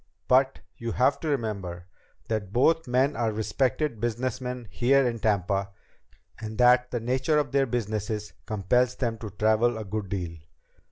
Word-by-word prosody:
But 130 +1 +3 0.2
you 115 -1 -4
have 130 +3 +2
to 160 - -5
remember 100 - -3 0.4
that 105 -4 -2
both 160 +7 +3
men 130 +4 +2
are 115 -2 0
respected 115 +4 -1
businessmen 125 +1 -3
here 135 +5 +3
in 115 -1 -2
Tampa 100 -2 0 0.7
and 110 -1 -6
that 125 0 +5
the 120 - -2
nature 130 +6 +1
of 150 - 0
their 135 -1 +2
businesses 105 -2 -3
compels 120 +4 +1
them 115 -4 -2
to 110 - -6
travel 110 +3 +2
a 110 - -5
good 100 0 -4
deal. 85 -4 -4
115 Hz, 155 wpm, -27 LUFS, 105-130 Hz, 0.7 s, that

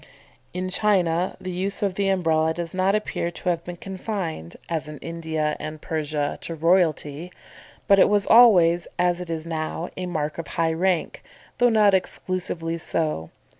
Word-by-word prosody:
In 185 +1 -3
China 185 -4 +1
the 185 - -5
use 190 +3 -3
of 195 -2 +1
the 195 +1 0
Umbrella 160 -4 +1
does 170 0 -4
not 190 +2 +2
appear 210 -5 -2
to 175 +1 -4
have 170 -1 -1
been 175 0 -7
confined, 185 - -5
as 160 -2 -3
in 150 - -8
India 160 -1 -3
and 155 0 -6
Persia, 150 -2 -2
to 165 - -4
royalty; 165 -1 +1 0.6
but 200 0 +6
it - - +6
was 205 -1 +2
always, 180 -8 +6
as 180 0 +1
it 180 - -7
is 160 -1 -4
now, 165 +1 -3
a 180 -1 -4
mark 155 -2 -3
of 165 - -5
high 165 +2 0
rank, 180 0 0 0.4
though 245 0 +5
not 210 -3 +4
exclusively 180 -3 -1
so. 155 - -1
170 Hz, 170 wpm, -24 LUFS, 160-185 Hz, 0.6 s, but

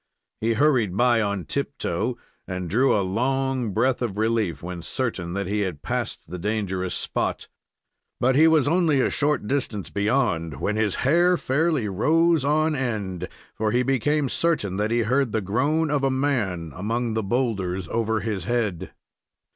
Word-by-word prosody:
He 115 +1 +1
hurried 120 -8 +2
by 120 -1 +4
on 100 -4 -2
tiptoe, 110 - -2 0.3
and 90 -2 -4
drew 125 +3 +3
a - - +2
long 130 +4 0
breath 125 +6 +1
of 110 -5 -2
relief 110 -6 0
when 90 0 -5
certain 90 -4 -2
that 100 +1 -2
he 105 +3 -1
had 90 -8 -3
passed - - -3
the 90 - -6
dangerous 95 -2 -2
spot. - - -2 0.7
But 130 +1 +3
he 155 +3 +6
was 155 -3 +4
only 160 -3 +3
a - - +2
short 145 -6 0
distance 115 -6 -2
beyond 100 - 0
when 105 - -1
his 110 -3 +1
hair 175 +5 +4
fairly 150 -3 +1
arose 160 - +2
on 155 +2 +2
end, 100 - -3 0.2
for 110 0 -1
he 125 +3 +2
became 135 +3 +1
certain 125 - 0
that 105 +1 0
he 120 +1 +2
heard 125 +1 +1
the 110 - +2
groan 140 - 0
of 145 -2 0
a 135 - +3
man 115 - -1
among 115 +4 -2
the 110 - 0
boulders 95 -5 -1
over 110 -1 0
his 105 -4 -3
head. 115 -8 -2
115 Hz, 165 wpm, -24 LUFS, 100-135 Hz, 0.7 s, he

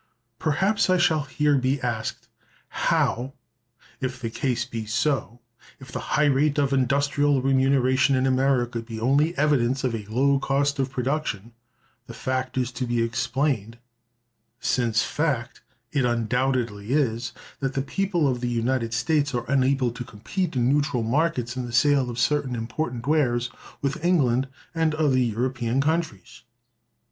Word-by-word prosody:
"Perhaps 190 +7 +1
I 185 - +4
shall 160 -4 +2
here 145 0 +2
be 130 +2 0
asked, 120 -3 -3 0.4
How, 130 +3 0 0.7
if 130 -1 -3
the 115 -3 -4
case 125 0 -1
be 110 -2 -6
so—if 120 0 -4
the - - -4 0.2
high 150 - +4
rate 145 +1 +2
of 140 -1 +2
industrial 140 +2 +2
remuneration 135 0 +3
in 130 0 +1
America 130 -2 +1
be 115 -1 -7
only 145 +8 +2
evidence 135 -3 +2
of 125 -3 0
a 105 -3 -5
low 135 +5 +2
cost 140 +1 0
of 135 0 0
production—the 125 -2 -5
fact 130 0 -2
is 125 -1 0
to 125 0 -4
be 120 -1 +1
explained, 120 -1 -1 0.8
since 115 -2 +1
fact 140 -8 -2 0.3
it 140 -3 +1
undoubtedly 120 -2 0
is, 120 -5 0 0.3
that 135 -1 -2
the 135 - 0
people 175 0 0
of 125 -2 -1
the 120 - -1
United 115 -1 -1
States 145 +3 +1
are 120 - -2
unable 135 -2 +2
to 125 +1 -6
compete 130 - -4
in 120 -1 +2
neutral 140 -3 +1
markets, 125 -1 0
in 125 -1 -3
the - - -7
sale 135 +1 +3
of 120 - -6
certain 130 0 +1
important 120 +1 -4
wares, 125 -5 +1 0.3
with 145 +4 -2
England 135 -8 +2 0.3
and 160 -2 +1
other 145 -4 +2
European 120 +1 0
countries? 155 - -2
130 Hz, 145 wpm, -25 LUFS, 120-145 Hz, 0.8 s, I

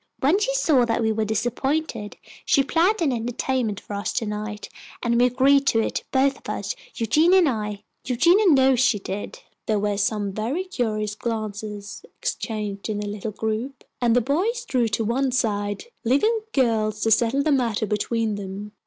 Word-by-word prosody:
When 305 +9 +3
she - - 0
saw 310 - +3
that 230 0 0
we 220 - +2
were 220 0 0
disappointed, 240 +2 -2 0.3
she 275 - +3
planned 345 +7 +2
an 290 - +2
entertainment 235 -2 -1
for 205 - -9
us 200 0 -2
to 230 - -1
night, 210 0 -5 0.4
and 235 -1 +2
we 250 - +6
agreed 275 +3 +3
to 225 - +3
it, 225 - -2
both 270 +1 +2
of - - -10
us, - - -3 0.2
Eugenia 310 - +4
and 360 -4 +5
I. 210 -5 -3 0.2
Eugenia 340 - +4
knows 265 -5 +5
she 250 -4 +3
did." 200 - -6 0.3
There 215 - +2
were 205 0 0
some 205 0 0
very 240 - -2
curious 215 - -2
glances 215 - -5 0.2
exchanged 215 - -4
in 210 -1 -2
the 210 - -4
little 205 +1 -4
group, 220 +5 -4 0.2
and 235 -1 +3
the 245 - +4
boys 395 - -1
drew 250 - +1
to 220 0 -1
one 260 +4 +1
side, 205 -4 -1 0.2
leaving 285 - +3 0.2
the 275 - +2
girls 215 -3 0
to 225 - +1
settle 235 +5 +3
the 310 - +1
matter 235 -5 +1
between 215 +1 -1
them. 200 +1 -7
230 Hz, 180 wpm, -23 LUFS, 210-275 Hz, 0.4 s, we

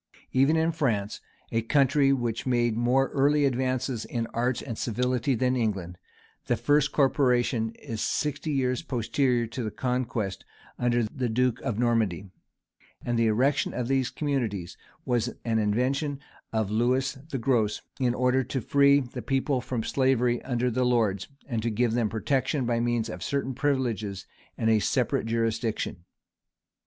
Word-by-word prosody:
Even 135 +5 +3
in 160 +1 +2
France, 115 -10 -1 0.3
a 115 - +1
country 135 +3 +3
which 120 -1 -1
made 120 -3 +2
more 125 +3 +2
early 145 +1 +3
advances 130 -2 -1
in 115 -2 -3
arts 120 +1 0
and 115 - -5
civility 125 +3 0
than 125 +2 +1
England, 95 -7 -2 0.5
the - - +1
first 150 0 +2
corporation 125 -5 +2
is 110 -2 -6
sixty 150 +1 -1
years 130 -3 0
posterior 125 0 0
to 115 +3 -6
the 110 - -2
conquest 120 -6 -2 0.4
under 120 -1 +2
the 125 +3 -2
duke 125 +1 +1
of 110 - -2
Normandy; 110 -6 +1 0.8
and 120 -1 0
the 115 - +3
erecting 130 +6 +1
of 125 -2 -2
these 135 -2 +1
communities 120 - -2 0.3
was 120 -1 0
an 115 -1 +1
invention 130 +7 0 0.3
of 110 -3 -1
Lewis 130 +4 +1
the 135 - -2
Gross, 115 -4 +1 0.2
in 125 -2 +1
order 125 +1 +2
to 130 +2 -3
free 140 +3 +4
the 125 -2 -7
people 135 -1 0
from 120 -3 -3
slavery 125 -2 +1
under 125 -1 -1
the 130 +2 +1
lords, 110 -6 +1 0.2
and 115 -5 -2
to 115 - -1
give 115 +1 +1
them 115 -2 +1
protection 130 +5 0
by 120 -1 +1
means 120 -1 0
of 110 - -7
certain 140 -1 -2
privileges 115 -8 -1 0.3
and 110 - 0
a 110 -1 +4
separate 105 - 0
jurisdiction. 115 -5 -1
125 Hz, 155 wpm, -27 LUFS, 115-135 Hz, 0.8 s, free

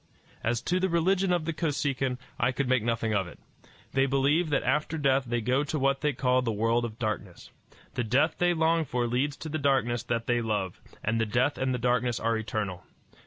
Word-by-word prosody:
As 120 +1 0
to 180 +1 +1
the 190 +1 +1
religion 180 +3 +2
of 175 -3 +1
the 165 - -1
Kosekin, 140 -5 -1 0.2
I 125 +1 +2
could 130 +1 -2
make 130 -2 +3
nothing 115 -1 -1
of 95 -3 +1
it. - - -12 0.6
They 135 0 +3
believe 140 +5 +2
that 145 - +1
after 150 +2 0
death 135 -2 +2
they 120 0 -1
go 130 +6 +1
to 155 - -2
what 135 0 +1
they 150 - +2
call 130 -1 +2
the 120 -2 -1
world 115 +3 +1
of 110 -1 -7
darkness. 105 -6 -4 0.4
The 120 - -1
death 130 +8 +1
they 175 0 +3
long 165 0 +2
for 125 -4 -1
leads 130 +5 0
to 160 - -7
the 155 +1 -2
darkness 135 -4 +1
that 115 -1 -2
they 120 -1 +1
love; 105 -5 -2 0.2
and 115 +1 +1
the 115 - 0
death 125 +6 +1
and 130 0 0
the 125 - 0
darkness 125 0 +1
are 115 0 +1
eternal. 105 -4 -3
125 Hz, 215 wpm, -28 LUFS, 115-145 Hz, 0.6 s, make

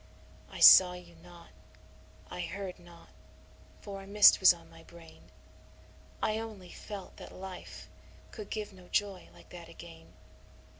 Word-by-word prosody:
I - - -10
saw 180 -1 +8
you 180 -1 -13
not, 170 +1 -17 0.8
I - - -8
heard 185 +1 -7
not, 175 -1 -18 0.7
for 200 -1 -9
a 195 - -14
mist 205 +1 +6
was 190 - +7
on 170 -1 -9
my 165 0 -17
brain 165 0 -17 0.9
I 215 0 -1
only 210 -5 -10
felt 200 -3 -10
that - - -12
life 185 -1 -11 0.4
could 215 -3 -10
give 210 -2 -6
no 180 -1 -17
joy 200 -2 -3
like - - -19
that 170 -2 -12
again. 80 - -14
180 Hz, 145 wpm, -30 LUFS, 170-200 Hz, 0.9 s, saw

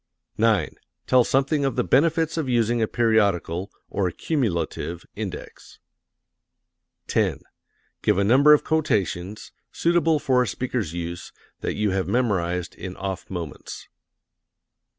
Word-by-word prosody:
9. 110 -7 +3 0.4
Tell 130 -1 +5
something 140 +4 +1
of 135 - 0
the 125 - +1
benefits 160 +5 +2
of 155 -5 -2
using 120 -1 +2
a 110 - +2
periodical 100 -6 +1 0.2
(or 95 -2 -1
cumulative) 85 - -2
index. - - -7 1.3
10. - - 0 0.6
Give 105 - +2
a 100 - +3
number 135 +8 +6
of 150 - +6
quotations, 105 - -1 0.2
suitable 165 -2 +2
for 130 -3 +2
a 125 - 0
speaker's 120 -5 -2
use, 85 0 -5 0.3
that - - -3
you 105 -1 0
have 95 0 -1
memorized 90 -8 0
in 95 -1 -7
off 95 -1 -5
moments. 85 -6 -7
110 Hz, 125 wpm, -24 LUFS, 90-135 Hz, 1.3 s, number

